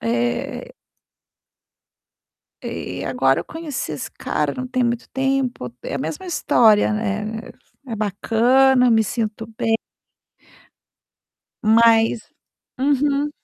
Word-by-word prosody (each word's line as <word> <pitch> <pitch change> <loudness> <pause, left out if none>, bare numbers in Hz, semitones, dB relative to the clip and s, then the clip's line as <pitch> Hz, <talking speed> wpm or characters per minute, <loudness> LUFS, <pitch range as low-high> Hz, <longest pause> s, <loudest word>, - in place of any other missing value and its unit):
É. 120 +1 -2 1.9
E 90 - -5
e - - -4
agora 135 +1 +2
eu - - -8
conheci 310 - -5
esse 145 - -6
cara, 150 -2 -2
não 255 - -4
tem 255 -1 0
muito 235 0 -2
tempo, 265 - -1
é - - -5
a - - -2
mesma 305 +7 -5
história, 220 - +3
né, 215 +1 -2
é - - -34 0.2
é 220 - -2
bacana, 245 +5 +3
me 225 -1 +4
sinto 220 +1 -3
bem 225 -2 +1 1.9
mas 225 +1 +4 0.6
uhum. 285 +1 +1
225 Hz, 110 wpm, -21 LUFS, 210-265 Hz, 1.9 s, me